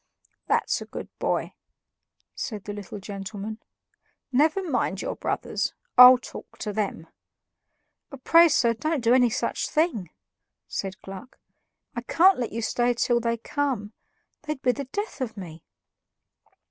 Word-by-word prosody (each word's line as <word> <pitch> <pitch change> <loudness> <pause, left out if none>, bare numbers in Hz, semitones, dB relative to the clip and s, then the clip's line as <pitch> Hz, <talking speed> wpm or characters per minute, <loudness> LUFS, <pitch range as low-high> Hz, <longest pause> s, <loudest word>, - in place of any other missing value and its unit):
"That's - - +1
a - - -6
good - - -7
boy," - - -1 0.8
said 215 -5 -5
the 205 - -6
little 205 -1 -7
gentleman. 200 +2 -6 0.7
"Never 310 +8 +2
mind 245 - -1
your - - -3
brothers. - - -2 0.2
I'll 250 +1 +11
talk 245 - -11
to 210 - -4
them." 200 -6 -2 1.2
"Pray, 335 0 +7
sir, 235 -5 +3
don't 305 +3 -2
do 235 +1 +4
any 250 -1 +5
such 225 - -2
thing," 285 - 0 0.6
said 190 -1 -5
Gluck. 195 +5 -10 0.6
"I 240 - -2
can't 355 +8 +4
let 240 - -2
you 230 +1 -4
stay 240 +2 +1
till 240 0 +2
they 235 0 -1
come; 235 -4 -2 0.5
they'd 300 -2 -5
be 250 - +4
the 280 +2 -5
death 405 - -5
of 225 -4 -4
me." 170 -4 -9
240 Hz, 140 wpm, -25 LUFS, 205-275 Hz, 1.2 s, I'll